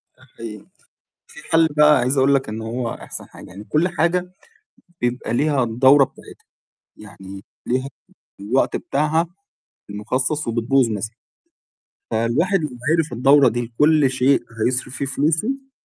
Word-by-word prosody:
ده - - -23
حقيقي، 105 -3 -9 0.6
في - - -14
حل 165 0 +5
بقى 150 -1 +6
عايز 130 +3 0
أقول 135 +1 +4
لك 135 - -1
إن 110 +1 -5
هو 115 +1 -3
أحسن - - -9
حاجة، - - -13
يعني 100 +3 -10
كل 155 +10 +1
حاجة 180 +1 -1 0.7
بيبقى 120 -1 -2
ليها 145 0 +1
الدورة 130 +5 +5
بتاعتها، - - -10 0.5
يعني 100 -2 -11 0.2
ليها 130 +2 -1 0.5
الوقت 120 +7 0
بتاعها 155 +4 0 0.6
المخصص 130 +8 -2
وبتبوظ 120 +2 +1
مثلًا، 110 +1 -4 1.0
فالواحد 125 - +1
لو 150 - -3 0.2
عرف 165 -4 0
الدورة 135 +2 +5
دي 120 0 -4
كل 150 -2 +4
شيء 130 +1 +2 0.2
هيصرف 125 +1 -2
فيه 140 - -3
فلوسه 165 - -1
130 Hz, 135 wpm, -21 LUFS, 115-150 Hz, 1.0 s, بقى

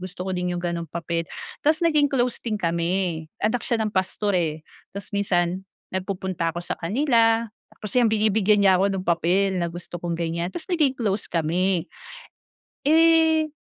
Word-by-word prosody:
gusto 185 0 -7
ko 190 - -2
din 180 0 -2
yung - - -3
gano'ng 170 -1 -3
papel." 170 0 -3 0.4
Ta's 310 +1 +3
naging 305 -3 +4
close 250 -2 0
din 220 -3 -2
kami. 170 -1 -1 0.2
Anak 220 +3 +1
siya 235 - 0
ng 215 - -1
pastor, 190 +2 0
eh. 160 -3 -1 0.4
Ta's 200 +2 -7
minsan 185 -2 0 0.3
nagpupunta 185 -3 -2
ako - - -3
sa - - -2
kanila 230 - +2 0.3
tapos 210 - -7
yun, 245 - +5
binibigyan 215 -1 +3
niya 190 -2 +5
ako 195 - +3
ng 190 -1 -2
papel 180 +3 +2
na 170 - 0
gusto 175 +1 -7
kong 170 0 -3
ganiyan, 170 0 -2
ta's 315 - -7
naging 305 -7 +2
close 210 -5 -1
kami. 175 +2 0 1.0
Eh, 320 +1 +4
190 Hz, 170 wpm, -24 LUFS, 175-225 Hz, 1.0 s, yun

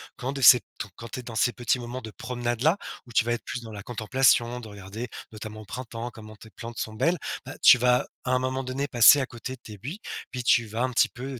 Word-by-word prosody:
quand 130 +2 -4
de 140 -1 -5
ces 125 0 +10 0.2
ton 110 - -5
quand 115 - -9
tu 130 - -5
es - - -17
dans 115 -2 -8
ces 120 +2 +2
petits 125 +1 0
moments 120 +1 -6
de 110 - -7
promenade 120 +1 -3
là, 160 +7 +4 0.3
où 120 - -13
tu 115 - +3
vas 120 - +1
être 120 - -4
plus 120 - -4
dans 110 - -9
la 105 -1 -7
contemplation, 120 +2 +2
de 115 - -9
regarder, 105 +3 -7 0.2
notamment, 110 0 -8
au - - -12
printemps, 120 +1 -6
comment 110 -1 -12
tes 110 +1 -15
plantes 115 +1 -9
sont 110 - -4
belles, 170 +11 +1 0.3
bah, - - -7
tu 125 - +9
vas, 125 0 +3 0.2
à 125 - 0
un 130 - +3
moment 130 +1 -2
donné, 130 +2 -3
passer 120 +2 +7
à - - 0
côté 120 +1 -7
de 130 - -26
tes 105 -2 -10
buis, 145 - -6 0.3
puis 125 -1 -5
tu 120 -1 +4
vas 110 +3 -2
un 130 - 0
petit 120 - +3
peu, 130 +1 -7
120 Hz, 270 wpm, -26 LUFS, 110-130 Hz, 0.3 s, ces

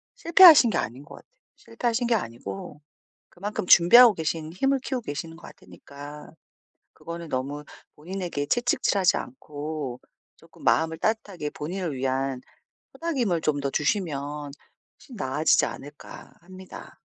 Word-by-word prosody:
실패하신 335 - +7
게 175 - -1
아닌 125 +6 -4
것 145 - -13
같아요. - - -18 0.3
실패하신 240 0 -2
게 235 - +2
아니고 115 - -6 0.5
그만큼 200 +2 -5
준비하고 215 +7 +8
계신 160 -1 -4
힘을 270 +8 +1
키우고 260 -2 -3
계시는 165 0 -6
것 170 - -19
같으니까 145 +1 -12 0.6
그거는 170 0 -8
너무 140 +2 -4 0.3
본인에게 175 -2 -5
채찍질하지 205 -5 +1
않고 145 -1 -6 0.4
쪼끔 - - -19
마음을 160 0 +2
따뜻하게 205 -8 -2
본인을 170 +1 -5
위한 130 0 -2 0.5
토닥임을 245 - -1
좀 145 -2 0
더 140 - -1
주시면 150 -5 -2 0.5
훨씬 260 - -14
나아지지 150 +1 +2
않을까 145 +1 -10
합니다. 185 +1 -12
160 Hz, 320 characters per minute, -25 LUFS, 145-205 Hz, 0.6 s, 준비하고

